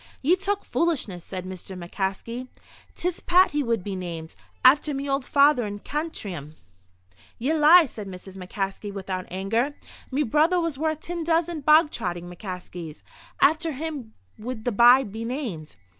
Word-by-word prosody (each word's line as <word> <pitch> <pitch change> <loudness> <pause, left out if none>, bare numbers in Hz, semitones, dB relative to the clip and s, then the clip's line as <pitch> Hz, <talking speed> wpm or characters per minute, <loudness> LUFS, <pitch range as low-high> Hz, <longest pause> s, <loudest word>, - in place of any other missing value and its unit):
"Ye 330 +7 +5
talk 395 +2 -2
foolishness," 250 - -1
said 185 0 -6
Mr. 185 0 -8
McCaskey. 195 +7 -4 0.5
"'Tis 355 0 -2
Pat 365 +2 +4
he 295 0 0
would 230 -7 0
be 200 0 -4
named, 170 -3 -6 0.3
after 285 +2 +6
me 275 +1 -3
old 275 0 0
father 280 -1 +4
in 205 -1 -4
Cantrim." 200 - -5 0.8
"Ye 265 +7 0
lie!" 320 +3 +7
said 215 -6 -8
Mrs. 190 0 -10
McCaskey, 195 +2 -4
without 190 -2 -5
anger. 225 +10 -1 0.3
"Me 280 +3 +1
brother 310 +8 +3
was 330 -5 -2
worth 315 0 -1
tin 340 -1 -4
dozen 330 0 0
bog 305 +2 +5
trotting 175 -6 -4
McCaskeys. 180 -3 -8 0.4
After 315 +1 +3
him 280 -6 -5 0.2
would 225 0 -6
the 245 - +1
bye 240 +5 +7
be 220 0 -6
named." 230 - -5
245 Hz, 155 wpm, -25 LUFS, 190-305 Hz, 0.8 s, lie